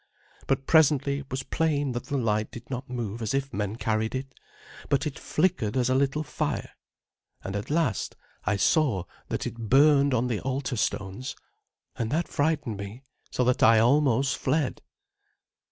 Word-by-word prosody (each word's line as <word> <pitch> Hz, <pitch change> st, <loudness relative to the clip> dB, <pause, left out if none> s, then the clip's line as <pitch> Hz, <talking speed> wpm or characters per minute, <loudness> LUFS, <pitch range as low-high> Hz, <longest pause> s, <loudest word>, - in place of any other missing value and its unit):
But 135 Hz, 0 st, 0 dB
presently 140 Hz, -3 st, +4 dB
it 140 Hz, -, -11 dB
was 130 Hz, 0 st, -3 dB
plain 145 Hz, -4 st, 0 dB
that 120 Hz, +1 st, -4 dB
the 140 Hz, 0 st, -2 dB
light 110 Hz, -3 st, 0 dB
did 120 Hz, +3 st, -11 dB
not 130 Hz, +1 st, -4 dB
move 120 Hz, -3 st, -4 dB
as 110 Hz, +3 st, -1 dB
if 135 Hz, 0 st, -2 dB
men 105 Hz, 0 st, -2 dB
carried 110 Hz, 0 st, -1 dB
it, 135 Hz, +1 st, -5 dB, 0.6 s
but 140 Hz, +1 st, +2 dB
it 150 Hz, -1 st, -4 dB
flickered 135 Hz, -, 0 dB
as 125 Hz, 0 st, +2 dB
a -, -, +4 dB
little 140 Hz, +3 st, +1 dB
fire; -, -, -3 dB, 0.7 s
and 95 Hz, -, -4 dB
at 100 Hz, -, -4 dB
last 150 Hz, -, 0 dB, 0.3 s
I -, -, +1 dB
saw 115 Hz, -, +2 dB, 0.2 s
that -, -, -3 dB
it 115 Hz, -2 st, -5 dB
burned 140 Hz, 0 st, +5 dB
on 120 Hz, +1 st, +1 dB
the 120 Hz, -4 st, -1 dB
altar 130 Hz, 0 st, -2 dB
stones, 105 Hz, +2 st, -2 dB, 0.6 s
and 115 Hz, -, -2 dB
that 160 Hz, +6 st, 0 dB
frightened 145 Hz, -7 st, 0 dB
me 100 Hz, +6 st, -8 dB, 0.3 s
so 125 Hz, -, 0 dB
that 125 Hz, 0 st, +2 dB
I 115 Hz, 0 st, +7 dB
almost 135 Hz, +2 st, +3 dB
fled. 140 Hz, 0 st, 0 dB
130 Hz, 170 wpm, -27 LUFS, 115-140 Hz, 0.7 s, I